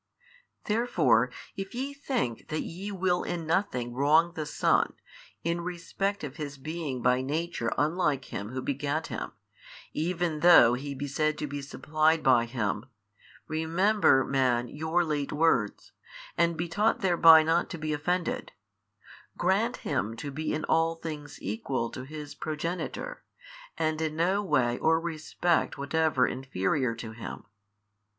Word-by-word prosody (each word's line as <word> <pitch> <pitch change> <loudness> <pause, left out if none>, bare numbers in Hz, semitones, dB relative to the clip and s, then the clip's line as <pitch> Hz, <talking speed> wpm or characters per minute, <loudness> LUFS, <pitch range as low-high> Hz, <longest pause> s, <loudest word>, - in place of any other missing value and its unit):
Therefore 160 - +2 0.3
if 195 +4 -6
ye 270 +3 -3
think 255 - -3
that 155 - -2
ye 190 +5 -6
will 185 -2 +1
in 170 -2 -4
nothing 155 -9 0
wrong 155 +6 +3
the 155 -3 -4
Son, - - +2 0.5
in 170 +1 -1
respect 180 +3 -3
of 145 -1 -6
His 145 -2 -5
being 150 -3 -4
by 125 +1 +3
Nature 145 -3 -2
unlike 150 -2 +1
Him 100 +2 -4
Who 130 +1 -4
begat 145 +3 -1
Him, - - -5 0.6
even 170 -1 -1
though 150 -8 +8
He 140 +3 -4
be 140 +2 -4
said 155 +2 0
to 150 - -3
be 145 0 -5
supplied 155 +3 +1
by 125 -3 +5
Him, 115 -2 -2 0.6
remember, 165 0 +3
man, 125 -3 +1
your 160 +4 0
late 150 -3 -2
words, 145 -9 +1 0.4
and 170 0 +2
be 170 +2 -2
taught 210 +6 +1
thereby 165 -4 +7
not 165 +2 +1
to 170 - -5
be 155 -1 -2
offended: 175 +4 -2 0.8
grant - - +1
Him 110 +2 -1
to 140 +5 -6
be 155 +3 -3
in 155 - -2
all 165 +1 +2
things 150 -3 -7
Equal 115 +4 -2
to 130 - -7
His 150 0 -8
Progenitor, 165 - -4 0.5
and 155 -1 0
in 155 -1 -1
no 185 +5 +2
way 130 -10 +1
or 160 0 +3
respect 165 +1 -1
whatever 140 -2 +2
inferior 130 0 -1
to 115 -1 -7
Him. 110 0 -8
155 Hz, 145 wpm, -28 LUFS, 135-170 Hz, 0.8 s, though